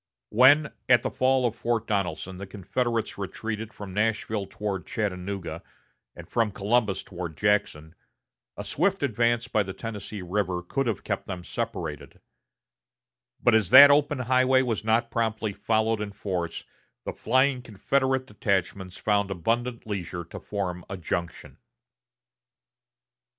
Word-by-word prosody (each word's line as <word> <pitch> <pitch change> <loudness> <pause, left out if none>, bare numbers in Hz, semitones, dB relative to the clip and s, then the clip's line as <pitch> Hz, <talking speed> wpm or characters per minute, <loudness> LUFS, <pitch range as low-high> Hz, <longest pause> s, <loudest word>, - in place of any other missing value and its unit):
When, 140 +6 +5 0.2
at 125 -1 +6
the - - -2
fall 130 0 +2
of 115 -2 0
Fort 115 -1 -1
Donelson 95 -3 -2
the 100 - -6
Confederates 115 +4 -2
retreated 110 +2 -4
from 100 -4 -9
Nashville 105 -1 -1
toward 100 -5 -4
Chattanooga, 100 -3 -3 0.5
and - - -11
from 115 -2 +1
Columbus 105 0 0
toward 85 -4 -7
Jackson, 90 -7 0 0.6
a 100 - -4
swift 175 - 0
advance 120 -2 +1
by 105 - +1
the 95 -1 -4
Tennessee 105 -3 -6
River 90 -1 -1
could 135 +9 -1
have 110 -5 -2
kept - - -3
them 90 -3 -5
separated; - - -5 1.2
but 120 - +5
as 110 -5 +3
that 140 +2 +11
open 145 0 +3
highway 130 +1 +3
was 115 -5 -2
not 115 +2 +1
promptly 110 -2 -1
followed 110 +1 0
in 105 -1 -5
force, 90 -4 -3 0.4
the - - -3
flying 130 +2 +2
Confederate 130 +4 0
detachments 95 -4 -2
found 100 +1 +1
abundant 115 +7 -2
leisure 95 -4 -4
to - - -9
form 90 -4 -4
a 95 - -4
junction. 85 -1 -4
105 Hz, 135 wpm, -26 LUFS, 95-120 Hz, 1.2 s, that